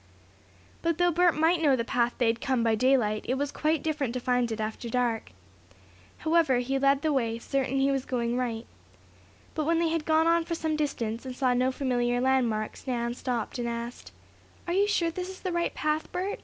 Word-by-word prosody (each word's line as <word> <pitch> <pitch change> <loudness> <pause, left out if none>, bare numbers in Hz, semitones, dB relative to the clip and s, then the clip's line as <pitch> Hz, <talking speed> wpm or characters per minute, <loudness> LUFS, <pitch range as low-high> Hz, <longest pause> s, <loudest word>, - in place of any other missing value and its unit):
But 335 -1 0
though 355 0 +3
Bert 350 +1 +3
might 325 +2 +3
know 285 -4 +4
the 230 -2 -2
path 240 0 0
they 245 - +2
had 230 +1 +1
come 260 -4 +1
by 225 -1 +3
daylight, 220 -3 +2
it 255 - +2
was 285 +1 -2
quite 310 -1 0
different 290 -6 -1
to - - 0
find 245 -1 +1
it 220 - -3
after 220 +2 -4
dark. 235 - -1 0.9
However, 320 -5 +3
he 265 +2 -1
led 275 0 +3
the 310 -1 +2
way, 230 -4 0
certain 270 +2 -1
that 270 - +2
he 275 - +3
was 270 -1 0
going 240 -2 -1
right. 235 -2 -2 0.9
But 310 - -2
when 330 +1 +2
they 335 0 +2
had 325 -1 -1
gone 315 0 +3
on 335 0 +3
for 335 0 -3
some 315 -1 -1
distance, 235 -7 -2
and 260 -1 -6
saw 255 -1 +2
no 255 +1 +2
familiar 245 -2 0
landmarks, 245 -4 0
Nan 235 -2 -1
stopped 245 -1 -3
and 235 0 -1
asked: 235 +1 -6 0.5
"Are 345 - -2
you 400 +2 +3
sure 345 -5 +1
this 365 +2 -5
is 380 - -10
the 370 - -2
right 345 0 -1
path, 305 +1 -1
Bert? 375 +3 -3
265 Hz, 215 wpm, -28 LUFS, 240-315 Hz, 0.9 s, know